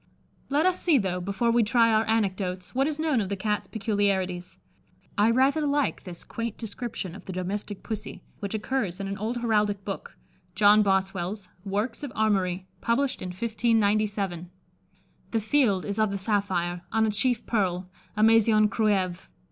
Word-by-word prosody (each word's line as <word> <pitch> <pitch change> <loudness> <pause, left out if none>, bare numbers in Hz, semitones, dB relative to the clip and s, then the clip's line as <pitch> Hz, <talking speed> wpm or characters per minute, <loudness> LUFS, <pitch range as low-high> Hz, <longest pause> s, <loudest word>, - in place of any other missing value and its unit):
_ - - -38 0.5
Let 290 +4 +2
us 370 -1 +2
see 330 -5 +4
though, 185 -5 -1
before 200 +6 0
we 235 +1 +4
try 230 +1 +4
our 220 +1 +2
anecdotes, 190 -4 -1
what 270 +2 +2
is 305 -1 -2
known 310 -7 +1
of 195 - -3
the 200 - -1
Cat's 210 +2 -2
peculiarities. 195 -4 -1 0.6
I 210 +2 +4
rather 270 +6 +3
like 285 -4 0
this 175 -2 -8
quaint 230 -2 -5
description 225 -4 -5
of 195 - -11
the - - -6
domestic 190 +2 -4
Pussy, 215 -2 -6 0.2
which 200 0 -3
occurs 210 -5 -2
in 195 - -3
an 195 0 -4
old 225 +4 -2
heraldic 210 -4 +1
book, 195 - -6 0.4
John 210 +1 +6
Bossewell's 190 0 -1
"Workes 210 +4 -2
of 285 -4 -5
Armorie," 190 -4 +1 0.2
published 255 +4 0
in - - -4
1597: 205 -3 0 0.8
"The 225 - 0
field 220 -4 +2
is 205 +1 -3
of 215 -1 +3
the 200 - -2
Saphire, 190 -4 -1
on 220 0 +3
a 215 - +1
chief 230 +3 0
Pearle, 185 -5 0 0.3
a 215 - +3
Masion 220 -1 +5
Cruieves. 195 -5 0
210 Hz, 170 wpm, -26 LUFS, 190-230 Hz, 0.8 s, John